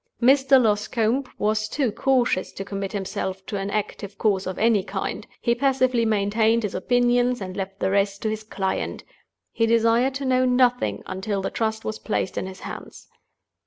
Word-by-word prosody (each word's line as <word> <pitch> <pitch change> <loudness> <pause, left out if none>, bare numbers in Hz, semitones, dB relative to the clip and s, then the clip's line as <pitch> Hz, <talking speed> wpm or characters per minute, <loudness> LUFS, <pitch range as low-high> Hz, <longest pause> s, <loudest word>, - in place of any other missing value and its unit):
Mr. 265 +2 +5
Loscombe 225 +3 +1
was 215 0 0
too 265 -4 0
cautious 245 -5 +1
to 195 - -7
commit 195 -1 -4
himself 190 -1 -4
to - - -5
an 195 0 -2
active 200 -1 -4
course 195 -4 +1
of 185 - -4
any 220 -2 +3
kind; - - -4
he 235 - +2
passively 255 -2 +2
maintained 220 +2 +2
his 210 - -2
opinions 245 +3 +2
and 185 -2 -6
left 195 0 -5
the 190 - 0
rest 200 0 0
to 220 - +1
his 215 0 -4
client— 195 -3 -3 0.5
he 230 - +1
desired 230 +3 +3
to 275 0 -3
know 255 0 +3
nothing 250 -1 +2
until 195 +2 -3
the - - -2
Trust 220 -1 -2
was 215 - -3
placed 200 -3 -2
in - - -3
his 190 0 -10
hands. - - -9
220 Hz, 175 wpm, -24 LUFS, 200-245 Hz, 0.5 s, Mr